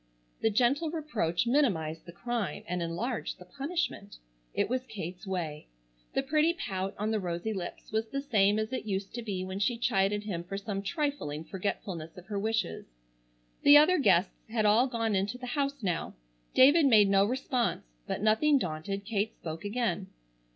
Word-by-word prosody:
The 225 Hz, -, +3 dB
gentle 255 Hz, +9 st, +2 dB
reproach 290 Hz, -, -1 dB
minimized 185 Hz, -, +1 dB
the -, -, -7 dB
crime, 230 Hz, +3 st, -3 dB
and 180 Hz, 0 st, -2 dB
enlarged 205 Hz, +9 st, -3 dB
the 180 Hz, -, -13 dB
punishment. 280 Hz, -, -3 dB, 0.3 s
It -, -, 0 dB
was 255 Hz, +3 st, -2 dB
Kate's 185 Hz, -1 st, -7 dB
way. 165 Hz, -6 st, -3 dB, 0.5 s
The 270 Hz, -, +2 dB
pretty 305 Hz, +4 st, +3 dB
pout 190 Hz, -, -3 dB
on 210 Hz, +2 st, -1 dB
the 220 Hz, -, +1 dB
rosy 180 Hz, +3 st, -2 dB
lips 180 Hz, -3 st, -6 dB
was 220 Hz, +1 st, 0 dB
the 275 Hz, +5 st, -3 dB
same 205 Hz, -6 st, +3 dB
as 220 Hz, +3 st, -2 dB
it 255 Hz, -, -3 dB
used 195 Hz, -1 st, -3 dB
to 240 Hz, -, -4 dB
be 195 Hz, -5 st, -3 dB
when 190 Hz, +1 st, -5 dB
she 235 Hz, +4 st, +1 dB
chided 205 Hz, -3 st, +1 dB
him 180 Hz, -5 st, -4 dB
for 195 Hz, +3 st, -5 dB
some 200 Hz, -1 st, -3 dB
trifling 200 Hz, -, -2 dB
forgetfulness 180 Hz, -3 st, -4 dB
of 180 Hz, -, -10 dB
her 205 Hz, 0 st, -3 dB
wishes. 220 Hz, -2 st, -1 dB, 0.7 s
The 290 Hz, +1 st, +9 dB
other 315 Hz, +4 st, +5 dB
guests 195 Hz, -7 st, +4 dB, 0.2 s
had 220 Hz, -1 st, 0 dB
all 220 Hz, +5 st, +5 dB
gone 230 Hz, -3 st, -1 dB
into 195 Hz, +5 st, 0 dB
the 250 Hz, -, -7 dB
house 280 Hz, -3 st, -1 dB
now. 175 Hz, -4 st, -2 dB, 0.4 s
David 285 Hz, +4 st, +7 dB
made 215 Hz, -5 st, +6 dB
no 195 Hz, 0 st, +5 dB
response, 250 Hz, +1 st, 0 dB, 0.2 s
but, -, -, -3 dB
nothing 275 Hz, +8 st, +4 dB
daunted, 190 Hz, 0 st, -3 dB
Kate 215 Hz, 0 st, -1 dB
spoke 160 Hz, +1 st, -7 dB
again. 205 Hz, -2 st, -1 dB
210 Hz, 175 wpm, -30 LUFS, 190-250 Hz, 0.7 s, The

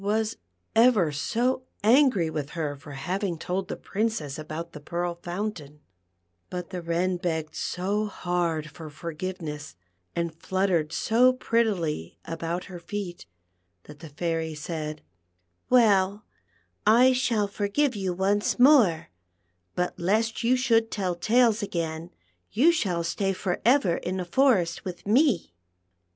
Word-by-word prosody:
23 205 Hz, +1 st, +1 dB
was 220 Hz, -1 st, -3 dB, 0.4 s
ever 225 Hz, -9 st, +5 dB
so 240 Hz, -, 0 dB, 0.2 s
angn' 225 Hz, -, +4 dB
with 150 Hz, -2 st, -3 dB
her 150 Hz, -3 st, -2 dB
for 145 Hz, +1 st, -11 dB
having 185 Hz, +5 st, -2 dB
told 185 Hz, +4 st, -3 dB
tlic -, -, -7 dB
Princess 200 Hz, -10 st, -2 dB
about 155 Hz, +2 st, -6 dB
the 150 Hz, -, -9 dB
Pearl 175 Hz, +3 st, -3 dB
Fountain, 175 Hz, -6 st, -5 dB, 0.7 s
but 180 Hz, -1 st, -6 dB
the 180 Hz, -2 st, -4 dB
Wren 175 Hz, +2 st, 0 dB
begged 160 Hz, -4 st, -2 dB
so 200 Hz, +4 st, -1 dB
hard 170 Hz, -5 st, -2 dB
for 160 Hz, -1 st, -9 dB
forgiveness, 160 Hz, -1 st, -6 dB, 0.4 s
and 170 Hz, -1 st, -1 dB
fluttered 175 Hz, -2 st, 0 dB
so 235 Hz, +8 st, +4 dB
prettily 200 Hz, -, -1 dB
about 165 Hz, +2 st, -3 dB
her 180 Hz, -2 st, -9 dB
feet, 180 Hz, 0 st, -6 dB, 0.6 s
that 150 Hz, -1 st, -13 dB
the 160 Hz, -1 st, -10 dB
Fairy 160 Hz, +1 st, -2 dB
said: 155 Hz, 0 st, -5 dB, 0.3 s
" 90 Hz, 0 st, -47 dB
Well, 205 Hz, -4 st, +4 dB, 0.6 s
I 245 Hz, +5 st, +6 dB
shall 235 Hz, -5 st, +1 dB
forgive 215 Hz, +7 st, 0 dB
you 190 Hz, -2 st, -2 dB
once 195 Hz, +3 st, +1 dB
more, 245 Hz, -, +5 dB, 0.7 s
but 180 Hz, +1 st, -2 dB
lest 220 Hz, +6 st, 0 dB
you 245 Hz, +2 st, +4 dB
should 230 Hz, -3 st, +2 dB
tell 190 Hz, -5 st, -1 dB
tales 225 Hz, +5 st, +3 dB
again, 165 Hz, -4 st, -3 dB, 0.4 s
you 300 Hz, +9 st, +5 dB
shall 180 Hz, -, 0 dB
stay 195 Hz, +3 st, -1 dB
for 185 Hz, -1 st, -3 dB
ever 240 Hz, -8 st, +4 dB
in 185 Hz, +1 st, -3 dB
the 180 Hz, -, -3 dB
forest 185 Hz, -5 st, +2 dB
with 180 Hz, -2 st, -7 dB
me." 225 Hz, -, +2 dB
180 Hz, 140 wpm, -26 LUFS, 165-215 Hz, 0.7 s, I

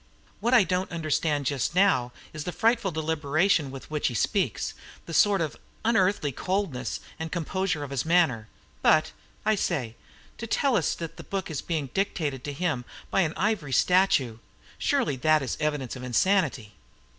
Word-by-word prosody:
What 240 Hz, +2 st, +2 dB
I 235 Hz, -, +7 dB
don't 185 Hz, 0 st, -1 dB
understand 155 Hz, -3 st, 0 dB
just 140 Hz, +4 st, -1 dB
now 180 Hz, -11 st, +3 dB, 0.2 s
is 155 Hz, -1 st, -5 dB
the 180 Hz, -, -3 dB
frightful 225 Hz, +4 st, +2 dB
deliberation 160 Hz, 0 st, +1 dB
with 135 Hz, +2 st, -10 dB
which 150 Hz, -1 st, 0 dB
he 120 Hz, -, -3 dB
speaks, -, -, 0 dB, 0.3 s
the 165 Hz, -, -7 dB
sort 200 Hz, +2 st, +4 dB
of 155 Hz, -3 st, -2 dB, 0.3 s
unearthly 195 Hz, -9 st, +2 dB
coldness 180 Hz, -4 st, -2 dB, 0.2 s
and 160 Hz, 0 st, -4 dB
composure 180 Hz, -1 st, -1 dB
of 140 Hz, -, -7 dB
his 135 Hz, -3 st, -1 dB
manner. 160 Hz, -10 st, +2 dB, 0.3 s
But 155 Hz, 0 st, +4 dB, 0.3 s
I 215 Hz, -, +4 dB
say! 140 Hz, -, -1 dB, 0.4 s
to 230 Hz, -, -5 dB
tell 270 Hz, +2 st, +2 dB
us 175 Hz, -, +1 dB
that 165 Hz, -1 st, -7 dB
the -, -, -8 dB
book 195 Hz, -3 st, -4 dB
is 150 Hz, -, -3 dB
being 155 Hz, -6 st, -3 dB
dictated 150 Hz, -9 st, -1 dB
to 145 Hz, -, -3 dB
him 145 Hz, -4 st, -1 dB, 0.3 s
by 195 Hz, -, +3 dB
an 160 Hz, -3 st, -1 dB
ivory 195 Hz, -10 st, 0 dB
statue: 140 Hz, -9 st, +3 dB, 0.4 s
surely 140 Hz, -, +1 dB
that 155 Hz, +3 st, +3 dB
is 130 Hz, -, -2 dB
an -, -, -12 dB
evidence 150 Hz, -5 st, -1 dB
of 130 Hz, -, -8 dB
insanity!" 130 Hz, -, +1 dB
160 Hz, 170 wpm, -27 LUFS, 140-190 Hz, 0.4 s, I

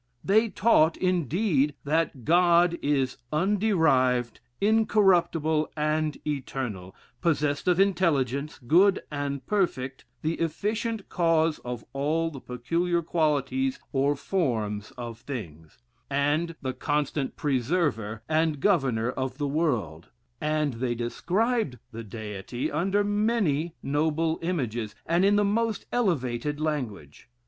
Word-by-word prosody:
They 220 Hz, +3 st, +3 dB
taught, 185 Hz, -5 st, +3 dB
indeed, 170 Hz, -, +1 dB
that 145 Hz, -5 st, -1 dB
God 175 Hz, 0 st, +4 dB
is 135 Hz, -3 st, 0 dB
underived, 155 Hz, -, +2 dB, 0.2 s
incorruptible, 180 Hz, -8 st, +3 dB
and 155 Hz, 0 st, 0 dB
eternal, 130 Hz, -10 st, -4 dB, 0.3 s
possessed 150 Hz, -3 st, 0 dB
of 180 Hz, 0 st, +3 dB
intelligence, 155 Hz, -7 st, +1 dB
good 185 Hz, +8 st, +4 dB
and 140 Hz, -1 st, -3 dB
perfect, 135 Hz, -11 st, -1 dB, 0.2 s
the 160 Hz, +2 st, -1 dB
efficient 210 Hz, +6 st, -2 dB
cause 165 Hz, -2 st, +2 dB
of 120 Hz, -2 st, -6 dB
all 155 Hz, +4 st, 0 dB
the 135 Hz, -4 st, -9 dB
peculiar 170 Hz, +8 st, -1 dB
qualities 135 Hz, -5 st, 0 dB, 0.2 s
or 140 Hz, +1 st, +2 dB
forms 110 Hz, -, -1 dB
of 120 Hz, -2 st, -6 dB
things; 85 Hz, -, -8 dB, 0.3 s
and 145 Hz, +4 st, 0 dB
the 130 Hz, -1 st, -2 dB
constant 145 Hz, +1 st, -1 dB
preserver 130 Hz, -, -1 dB
and 155 Hz, -1 st, +1 dB
governor 130 Hz, -, +2 dB
of 130 Hz, 0 st, -4 dB
the 145 Hz, -1 st, -1 dB
world; 120 Hz, -, -1 dB, 0.3 s
and 150 Hz, -2 st, 0 dB
they 120 Hz, +1 st, -2 dB
described 180 Hz, -, -1 dB
the 115 Hz, +1 st, -7 dB
Deity 110 Hz, +2 st, -5 dB
under 190 Hz, +7 st, +1 dB
many 205 Hz, -7 st, 0 dB
noble 160 Hz, +3 st, 0 dB
images, 120 Hz, -, -2 dB
and 170 Hz, +3 st, +2 dB
in 200 Hz, +1 st, +4 dB
the 205 Hz, 0 st, +3 dB
most 225 Hz, +1 st, 0 dB
elevated 145 Hz, -, 0 dB
language. 120 Hz, -, -4 dB
150 Hz, 115 wpm, -27 LUFS, 130-175 Hz, 0.3 s, God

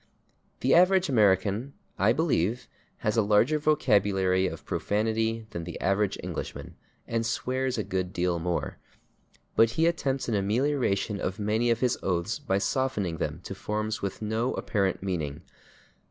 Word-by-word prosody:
The 130 Hz, -, +3 dB
average 185 Hz, 0 st, +5 dB
American, 105 Hz, +2 st, +2 dB, 0.3 s
I -, -, +4 dB
believe, 120 Hz, -, 0 dB, 0.4 s
has 105 Hz, +2 st, +1 dB
a -, -, +6 dB
larger 110 Hz, +9 st, +3 dB
vocabulary 100 Hz, -11 st, +2 dB
of -, -, -7 dB
profanity 110 Hz, +1 st, -1 dB
than 85 Hz, -, -5 dB
the 85 Hz, +1 st, -7 dB
average 100 Hz, +1 st, +1 dB
Englishman, -, -, -6 dB, 0.3 s
and 115 Hz, 0 st, -1 dB
swears 130 Hz, +2 st, -1 dB
a 110 Hz, -, 0 dB
good 95 Hz, -2 st, -2 dB
deal 90 Hz, -1 st, 0 dB
more, 85 Hz, +1 st, -2 dB, 0.8 s
but 115 Hz, -, +5 dB
he 165 Hz, -, +4 dB
attempts 140 Hz, -6 st, 0 dB
an 115 Hz, -, -1 dB
amelioration 105 Hz, -1 st, 0 dB
of 95 Hz, -, -2 dB
many 110 Hz, +3 st, +1 dB
of 115 Hz, 0 st, +1 dB
his 125 Hz, -1 st, +1 dB
oaths 95 Hz, +3 st, -1 dB
by 95 Hz, -, 0 dB
softening 100 Hz, -6 st, -1 dB
them -, -, -3 dB
to -, -, -6 dB
forms 110 Hz, +1 st, -3 dB
with 100 Hz, +2 st, -4 dB
no 110 Hz, +4 st, -1 dB
apparent 100 Hz, -3 st, -1 dB
meaning. 80 Hz, -5 st, -3 dB
105 Hz, 150 wpm, -27 LUFS, 95-125 Hz, 0.8 s, a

